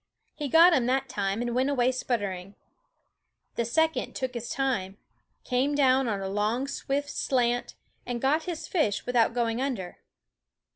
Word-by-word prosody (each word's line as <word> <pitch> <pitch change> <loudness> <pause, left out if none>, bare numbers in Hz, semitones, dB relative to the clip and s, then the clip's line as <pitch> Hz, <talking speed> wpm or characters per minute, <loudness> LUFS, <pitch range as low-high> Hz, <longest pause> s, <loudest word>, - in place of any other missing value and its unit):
He 295 - -4
got 335 +5 +7
him 250 -6 +2
that 265 +1 +1
time 200 +3 -1
and 240 -1 -2
went 260 +3 +1
away 255 -3 +2
sputter 240 -6 -1
ing. 185 +2 -9 1.0
The 235 - -1
second 320 +7 0
took 260 -2 -3
his 235 -1 -5
time, 200 -8 -1 0.5
came 265 +4 0
down 265 -2 +3
on 205 -3 -1
a 195 - -3
long 210 +7 -1
swift 285 +1 -3
slant, 245 -2 0 0.3
and 245 -1 -4
got 300 +5 +1
his 345 -3 -5
fish 300 - 0
without 240 -1 +2
going 235 0 0
under. 230 -10 -4
250 Hz, 160 wpm, -27 LUFS, 225-275 Hz, 1.0 s, got